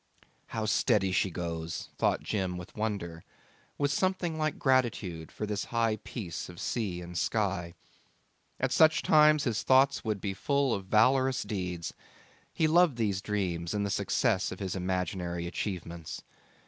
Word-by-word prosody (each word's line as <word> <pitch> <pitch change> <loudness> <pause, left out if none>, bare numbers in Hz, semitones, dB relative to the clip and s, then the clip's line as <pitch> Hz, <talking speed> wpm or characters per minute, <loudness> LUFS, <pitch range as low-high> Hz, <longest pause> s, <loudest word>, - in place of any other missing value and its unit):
'How 110 -1 -3
steady 105 -3 +2
she 95 - +2
goes,' 85 -2 -4
thought - - +1
Jim 95 -4 -2
with 90 0 -10
wonder, 100 -7 -3 0.5
with 145 -1 +1
something 185 0 0
like 155 -1 -1
gratitude 115 - 0
for 105 - -4
this 105 -1 -2
high 115 -2 +1
peace 90 -6 -6
of 90 -1 -11
sea 100 -7 -2
and 90 0 -9
sky. 95 -4 -1 0.8
At - - 0
such 160 +1 +5
times 150 -1 +5
his 115 -4 0
thoughts 135 +1 +4
would 110 -3 -1
be 95 0 -3
full 140 +4 +1
of 95 -2 -4
valorous 130 +5 +3
deeds: 90 -5 -4 0.6
he 160 - +1
loved 170 -3 +4
these 100 -4 0
dreams 90 -4 -2
and 100 0 0
the 100 - -2
success 95 0 +1
of 90 - -6
his 95 -2 -3
imaginary 90 -1 -2
achievements. 85 -3 -5
100 Hz, 150 wpm, -30 LUFS, 90-130 Hz, 0.8 s, such